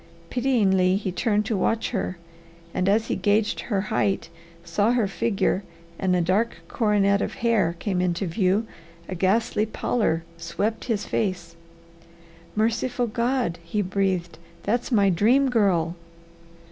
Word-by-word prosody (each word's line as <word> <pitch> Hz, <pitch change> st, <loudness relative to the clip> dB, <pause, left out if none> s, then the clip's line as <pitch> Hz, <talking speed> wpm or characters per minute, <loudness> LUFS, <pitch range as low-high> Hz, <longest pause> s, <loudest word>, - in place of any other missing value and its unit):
Pityingly 200 Hz, -8 st, +3 dB
he 200 Hz, -2 st, -3 dB
turned 210 Hz, +2 st, +1 dB
to 220 Hz, -, -1 dB
watch 225 Hz, +4 st, 0 dB
her, 190 Hz, -5 st, -2 dB, 0.6 s
and 185 Hz, +1 st, +1 dB
as 220 Hz, +2 st, +3 dB
he -, -, -1 dB
gauged 210 Hz, +1 st, +1 dB
her 200 Hz, -5 st, -1 dB
height, 195 Hz, -4 st, 0 dB, 0.4 s
saw 205 Hz, +7 st, +2 dB
her 235 Hz, -5 st, +2 dB
figure, 200 Hz, -1 st, 0 dB, 0.4 s
and 185 Hz, -1 st, +2 dB
a 180 Hz, -, +2 dB
dark 195 Hz, +7 st, +1 dB
coronet 200 Hz, -2 st, +2 dB
of -, -, -3 dB
hair 210 Hz, -8 st, +1 dB
came 185 Hz, 0 st, -1 dB
into 180 Hz, +1 st, 0 dB
view, 190 Hz, +4 st, +1 dB, 0.4 s
a -, -, -5 dB
ghastly 210 Hz, +4 st, +1 dB
pallor 210 Hz, -6 st, 0 dB
swept 200 Hz, +7 st, -2 dB
his 220 Hz, -4 st, -1 dB
face. 180 Hz, -5 st, -2 dB, 1.0 s
"Merciful 235 Hz, +3 st, 0 dB
God!" 235 Hz, -5 st, -1 dB
he 205 Hz, +5 st, -1 dB
breathed, 185 Hz, -3 st, -1 dB, 0.2 s
"that's 240 Hz, +4 st, -1 dB
my 200 Hz, -4 st, +4 dB
Dream 250 Hz, +9 st, +3 dB
Girl!" 180 Hz, -7 st, +2 dB
205 Hz, 135 wpm, -24 LUFS, 185-225 Hz, 1.0 s, my